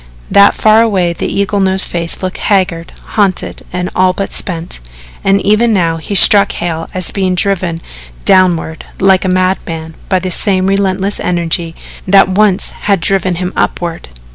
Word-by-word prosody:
That 200 Hz, 0 st, +5 dB
far 215 Hz, +1 st, +4 dB
away 190 Hz, -7 st, +1 dB
the -, -, -4 dB
eagle 200 Hz, +1 st, -1 dB
nosed 190 Hz, 0 st, +3 dB
face 170 Hz, +1 st, -3 dB
looked 185 Hz, 0 st, -4 dB
haggard, 180 Hz, -5 st, 0 dB, 0.2 s
haunted 200 Hz, -4 st, -1 dB
and 180 Hz, 0 st, -3 dB
all 185 Hz, 0 st, +2 dB
but 195 Hz, +1 st, -4 dB
spent, 170 Hz, -, -4 dB, 0.4 s
and 195 Hz, 0 st, +2 dB
even 215 Hz, +3 st, +2 dB
now 165 Hz, -4 st, 0 dB
he 180 Hz, +5 st, -5 dB
struck 200 Hz, +1 st, +5 dB
Hale 165 Hz, -1 st, -4 dB
as 185 Hz, -2 st, -2 dB
being 190 Hz, -2 st, -1 dB
driven 180 Hz, -3 st, -1 dB, 0.5 s
downward 175 Hz, -4 st, +2 dB, 0.2 s
like 190 Hz, -1 st, +3 dB
a -, -, 0 dB
madman 180 Hz, -3 st, -2 dB, 0.2 s
by 190 Hz, -, +2 dB
the 185 Hz, 0 st, -3 dB
same 185 Hz, 0 st, +1 dB
relentless 195 Hz, 0 st, 0 dB
energy 170 Hz, -1 st, -2 dB, 0.3 s
that 195 Hz, 0 st, +5 dB
once 195 Hz, 0 st, +1 dB
had 200 Hz, -2 st, -1 dB
driven 185 Hz, 0 st, 0 dB
him 180 Hz, +2 st, -4 dB
upward. 170 Hz, -, -3 dB
185 Hz, 160 wpm, -12 LUFS, 175-195 Hz, 0.5 s, That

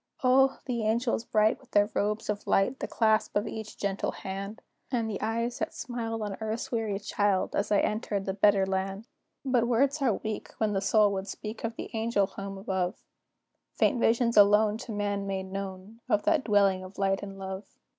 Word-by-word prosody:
O! 265 Hz, +1 st, +5 dB
the 240 Hz, -3 st, -2 dB
angels 230 Hz, +1 st, 0 dB
bright, 215 Hz, 0 st, +2 dB
with 265 Hz, -, -21 dB
their 205 Hz, +1 st, +3 dB
robes 210 Hz, +2 st, -1 dB
of 210 Hz, -1 st, -3 dB
light, 245 Hz, +7 st, +2 dB
The -, -, -3 dB
clasp 220 Hz, -1 st, +1 dB
of 205 Hz, +2 st, +1 dB
each 220 Hz, -1 st, -7 dB
gentle 200 Hz, -1 st, -1 dB
hand, 195 Hz, +2 st, -6 dB, 0.3 s
And 235 Hz, -4 st, 0 dB
the 210 Hz, -3 st, -4 dB
eyes 230 Hz, +2 st, -1 dB
that 320 Hz, -, -3 dB
smiled 225 Hz, -2 st, -4 dB
on 205 Hz, -2 st, -4 dB
earth's 225 Hz, +5 st, -3 dB
weary 220 Hz, -4 st, -1 dB
child, 205 Hz, -1 st, 0 dB
As 205 Hz, +1 st, -1 dB
I 205 Hz, -, +4 dB
entered 205 Hz, -2 st, -1 dB
the 190 Hz, -, -1 dB
better 200 Hz, -1 st, +4 dB
land! 190 Hz, +2 st, -2 dB, 0.4 s
But 250 Hz, -3 st, +2 dB
words 275 Hz, +5 st, +2 dB
are 245 Hz, -7 st, +3 dB
weak 215 Hz, -1 st, -5 dB
when 215 Hz, -2 st, +1 dB
the 195 Hz, -, 0 dB
soul 205 Hz, +1 st, +4 dB
would 190 Hz, 0 st, -3 dB
speak 215 Hz, +3 st, -7 dB
Of 230 Hz, 0 st, -2 dB
the -, -, -7 dB
angel 225 Hz, -2 st, +1 dB
home 195 Hz, 0 st, -7 dB
above; 190 Hz, -2 st, -1 dB, 0.8 s
Faint 250 Hz, -, +2 dB
visions 230 Hz, 0 st, +2 dB
alone 210 Hz, +1 st, +6 dB
are -, -, -4 dB
to -, -, -5 dB
man 205 Hz, -1 st, -2 dB
made 190 Hz, -1 st, -3 dB
known, 195 Hz, +2 st, -6 dB
Of 210 Hz, -, +2 dB
that 310 Hz, -5 st, +2 dB
dwelling 200 Hz, -3 st, +3 dB
of 185 Hz, +1 st, -11 dB
light 195 Hz, -1 st, +1 dB
and 195 Hz, -1 st, -7 dB
love. 190 Hz, +1 st, -6 dB
210 Hz, 195 wpm, -28 LUFS, 195-230 Hz, 0.8 s, alone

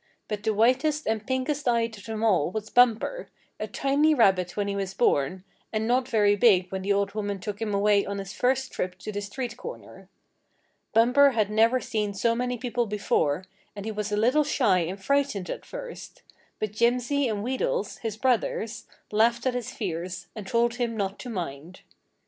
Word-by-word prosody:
But 210 Hz, -1 st, -3 dB
the 220 Hz, -, +1 dB
whitest 265 Hz, +7 st, +2 dB
and 220 Hz, -1 st, -2 dB
pinkest 260 Hz, +2 st, -1 dB
eyed 230 Hz, -2 st, +1 dB
of 200 Hz, -, -13 dB
them 220 Hz, -1 st, -4 dB
all 190 Hz, -9 st, +3 dB
was 215 Hz, +3 st, -5 dB
Bumper, 245 Hz, -, +3 dB, 0.3 s
a -, -, -3 dB
tiny 290 Hz, +3 st, +2 dB
rabbit 190 Hz, -7 st, +3 dB
when 205 Hz, -1 st, 0 dB
he 200 Hz, -, -2 dB
was 195 Hz, -1 st, -3 dB
born, 180 Hz, -, +1 dB, 0.3 s
and 220 Hz, 0 st, -1 dB
not 250 Hz, +1 st, +2 dB
very 210 Hz, -5 st, +3 dB
big 195 Hz, -5 st, +4 dB
when 190 Hz, 0 st, -3 dB
the 200 Hz, +2 st, -1 dB
old 200 Hz, 0 st, +1 dB
woman 205 Hz, -2 st, -2 dB
took 205 Hz, +2 st, -6 dB
him 220 Hz, -2 st, -1 dB
away 200 Hz, 0 st, +3 dB
on 200 Hz, -, -3 dB
his 195 Hz, 0 st, -6 dB
first 260 Hz, +1 st, 0 dB
trip 180 Hz, 0 st, -3 dB
to 215 Hz, -, -6 dB
the 205 Hz, 0 st, -3 dB
street 240 Hz, +4 st, -5 dB
corner. 480 Hz, -, -10 dB, 0.8 s
Bumper 250 Hz, +5 st, +5 dB
had 215 Hz, -3 st, +1 dB
never 225 Hz, +4 st, +4 dB
seen 210 Hz, -4 st, -2 dB
so 230 Hz, +4 st, +2 dB
many 250 Hz, +1 st, -2 dB
people 240 Hz, -1 st, -1 dB
before, 185 Hz, -5 st, 0 dB, 0.3 s
and 200 Hz, 0 st, -7 dB
he 220 Hz, -, -2 dB
was 210 Hz, 0 st, -3 dB
a 210 Hz, -, 0 dB
little 250 Hz, +8 st, +3 dB
shy 235 Hz, -10 st, +2 dB
and 180 Hz, +3 st, -3 dB
frightened 270 Hz, -4 st, 0 dB
at -, -, -7 dB
first; -, -, -9 dB, 0.3 s
but 215 Hz, -2 st, -3 dB
Jimsy 245 Hz, +5 st, +1 dB
and 210 Hz, -3 st, -2 dB
Wheedles, 475 Hz, -, -2 dB
his 220 Hz, -2 st, -4 dB
brothers, 240 Hz, -2 st, -1 dB, 0.2 s
laughed 235 Hz, +3 st, +2 dB
at 255 Hz, -, +2 dB
his 245 Hz, -2 st, -3 dB
fears, 180 Hz, -2 st, -4 dB
and 210 Hz, -3 st, -7 dB
told 235 Hz, +1 st, +1 dB
him 235 Hz, -2 st, -2 dB
not 195 Hz, -1 st, -2 dB
to 250 Hz, -, -7 dB
mind. 170 Hz, -4 st, -6 dB
220 Hz, 190 wpm, -26 LUFS, 200-245 Hz, 0.8 s, Bumper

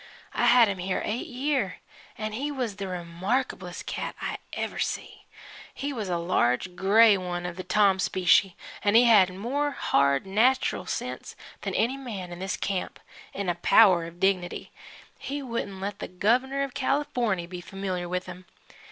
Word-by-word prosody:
I 240 Hz, -, +2 dB
had 240 Hz, -1 st, +7 dB
him 195 Hz, -2 st, -3 dB
here 185 Hz, +1 st, -1 dB
eight 225 Hz, +4 st, -3 dB
year 260 Hz, -6 st, -1 dB, 0.4 s
and 215 Hz, 0 st, -4 dB
he 275 Hz, +7 st, -2 dB
was 245 Hz, -7 st, -3 dB
the 200 Hz, -, -4 dB
remarkablest 180 Hz, +2 st, -3 dB
cat -, -, -4 dB
I -, -, -4 dB
ever -, -, -4 dB
see. -, -, -4 dB, 0.5 s
He 285 Hz, +1 st, -3 dB
was 215 Hz, -6 st, -4 dB
a 175 Hz, -, 0 dB
large 170 Hz, -1 st, 0 dB
grey 210 Hz, +3 st, +6 dB
one 175 Hz, -1 st, -4 dB
of 180 Hz, -1 st, -4 dB
the 185 Hz, -, -6 dB
Tom 195 Hz, 0 st, +3 dB
specie, 185 Hz, 0 st, +3 dB, 0.3 s
an' 205 Hz, +1 st, +3 dB
he 235 Hz, -, +8 dB
had 210 Hz, -6 st, +6 dB
more 255 Hz, +10 st, -1 dB
hard, 140 Hz, -, +1 dB
natchral 235 Hz, +7 st, +2 dB
sense -, -, -5 dB, 0.3 s
than -, -, -3 dB
any 250 Hz, +5 st, +1 dB
man 205 Hz, -9 st, -6 dB
in 175 Hz, -, -8 dB
this 190 Hz, 0 st, -3 dB
camp 195 Hz, -2 st, -3 dB, 0.4 s
'n' 200 Hz, -1 st, -3 dB
a 175 Hz, -, +2 dB
power 175 Hz, 0 st, +5 dB
of 170 Hz, +1 st, -11 dB
dignity 185 Hz, -2 st, 0 dB, 0.5 s
he 285 Hz, +1 st, -4 dB
wouldn't 230 Hz, -6 st, -4 dB
let 200 Hz, +1 st, -4 dB
the -, -, -5 dB
Gov'ner 250 Hz, +9 st, +1 dB
of 275 Hz, -2 st, -5 dB
Californy 250 Hz, -9 st, 0 dB
be 180 Hz, 0 st, -8 dB
familiar 185 Hz, -2 st, -4 dB
with 180 Hz, 0 st, -2 dB
him. 180 Hz, 0 st, -10 dB
195 Hz, 170 wpm, -27 LUFS, 180-240 Hz, 0.5 s, he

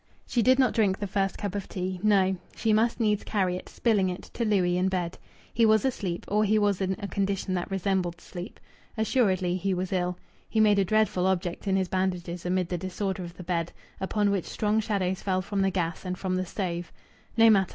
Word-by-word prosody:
She 240 Hz, -, +1 dB
did 255 Hz, +3 st, +5 dB
not 260 Hz, -2 st, +3 dB
drink 200 Hz, -4 st, +2 dB
the 205 Hz, -, -3 dB
first 195 Hz, 0 st, -1 dB
cup 200 Hz, -3 st, -3 dB
of 200 Hz, -1 st, -4 dB
tea. 185 Hz, 0 st, -3 dB
No! 195 Hz, -2 st, +3 dB, 0.2 s
She 220 Hz, -1 st, +1 dB
must 230 Hz, +3 st, +2 dB
needs 210 Hz, -2 st, +1 dB
carry 190 Hz, -4 st, 0 dB
it, 180 Hz, -, -7 dB
spilling 205 Hz, -5 st, +2 dB
it, 180 Hz, -, -7 dB
to 235 Hz, -, -2 dB
Louis 190 Hz, -5 st, +2 dB
in 185 Hz, +1 st, +2 dB
bed. 180 Hz, -2 st, -2 dB, 0.3 s
He 230 Hz, -, +2 dB
was 220 Hz, 0 st, +5 dB
asleep, 190 Hz, -9 st, -2 dB
or 210 Hz, +1 st, +2 dB
he 215 Hz, +1 st, +3 dB
was 205 Hz, -2 st, +2 dB
in 190 Hz, 0 st, 0 dB
a 205 Hz, -2 st, -5 dB
condition 195 Hz, -1 st, -1 dB
that 175 Hz, -1 st, -2 dB
resembled 190 Hz, -3 st, -1 dB
sleep. 175 Hz, +3 st, -8 dB, 0.4 s
Assuredly 190 Hz, -6 st, +2 dB
he 190 Hz, 0 st, 0 dB
was 185 Hz, +1 st, -3 dB
ill. 180 Hz, -1 st, 0 dB, 0.3 s
He 220 Hz, -, 0 dB
made 210 Hz, -2 st, +5 dB
a -, -, +4 dB
dreadful 210 Hz, -2 st, +2 dB
object 180 Hz, 0 st, -1 dB
in 190 Hz, -, +2 dB
his 190 Hz, -1 st, +1 dB
bandages 180 Hz, -2 st, -2 dB
amid 180 Hz, -1 st, 0 dB
the 175 Hz, -, -2 dB
disorder 190 Hz, +1 st, -3 dB
of 170 Hz, 0 st, -9 dB
the 180 Hz, -, -8 dB
bed, 170 Hz, -1 st, -2 dB, 0.3 s
upon 205 Hz, +1 st, +1 dB
which 195 Hz, -4 st, 0 dB
strong 215 Hz, 0 st, 0 dB
shadows 195 Hz, -4 st, -1 dB
fell 185 Hz, -1 st, 0 dB
from 200 Hz, +1 st, -1 dB
the 195 Hz, -, +3 dB
gas 170 Hz, -3 st, -2 dB
and 180 Hz, -1 st, -3 dB
from 185 Hz, -1 st, -1 dB
the 185 Hz, 0 st, -1 dB
stove. 175 Hz, -3 st, -3 dB, 0.5 s
No 225 Hz, 0 st, +7 dB
matter! 195 Hz, -3 st, +3 dB
190 Hz, 220 wpm, -27 LUFS, 180-210 Hz, 0.5 s, No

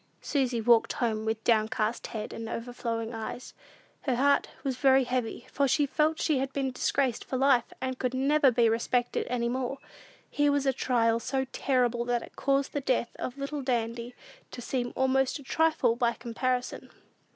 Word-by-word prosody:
Susy 255 Hz, -5 st, 0 dB
walked 230 Hz, 0 st, +4 dB
home 220 Hz, -3 st, -1 dB
with 220 Hz, 0 st, -2 dB
downcast 220 Hz, 0 st, +1 dB
head 215 Hz, -1 st, -6 dB
and 225 Hz, 0 st, -6 dB
overflowing 230 Hz, -1 st, -4 dB
eyes. 225 Hz, +2 st, -6 dB, 0.5 s
Her 260 Hz, -4 st, 0 dB
heart 280 Hz, +3 st, +3 dB
was 270 Hz, -3 st, -1 dB
very 265 Hz, -1 st, +5 dB
heavy, 245 Hz, -1 st, -3 dB
for 280 Hz, -1 st, +2 dB
she 290 Hz, +3 st, +3 dB
felt 310 Hz, +3 st, +1 dB
she 300 Hz, -5 st, +1 dB
had 270 Hz, 0 st, -2 dB
been 270 Hz, -2 st, -1 dB
disgraced 255 Hz, -1 st, 0 dB
for 260 Hz, -, -3 dB
life, 260 Hz, -3 st, +3 dB
and 260 Hz, 0 st, -3 dB
could 255 Hz, 0 st, -1 dB
never 280 Hz, +2 st, +4 dB
be 240 Hz, -1 st, +3 dB
respected 235 Hz, +2 st, 0 dB
any 235 Hz, -1 st, 0 dB
more. 255 Hz, +2 st, -2 dB, 0.5 s
Here 290 Hz, 0 st, +2 dB
was 285 Hz, -1 st, +1 dB
a 270 Hz, -, +3 dB
trial 230 Hz, -3 st, +1 dB
so 265 Hz, +3 st, -1 dB
terrible 245 Hz, -3 st, +1 dB
that 240 Hz, -1 st, 0 dB
it -, -, -13 dB
caused 275 Hz, 0 st, 0 dB
the 290 Hz, -, -1 dB
death 255 Hz, -3 st, 0 dB
of 255 Hz, +2 st, -5 dB
little 280 Hz, +1 st, -4 dB
Dandy 235 Hz, -1 st, -2 dB, 0.3 s
to -, -, -9 dB
seem 245 Hz, 0 st, -2 dB
almost 265 Hz, +1 st, +2 dB
a 285 Hz, -, -12 dB
trifle 310 Hz, -5 st, +2 dB
by 235 Hz, -1 st, +1 dB
comparison. 250 Hz, +2 st, -3 dB
255 Hz, 175 wpm, -28 LUFS, 235-270 Hz, 0.5 s, very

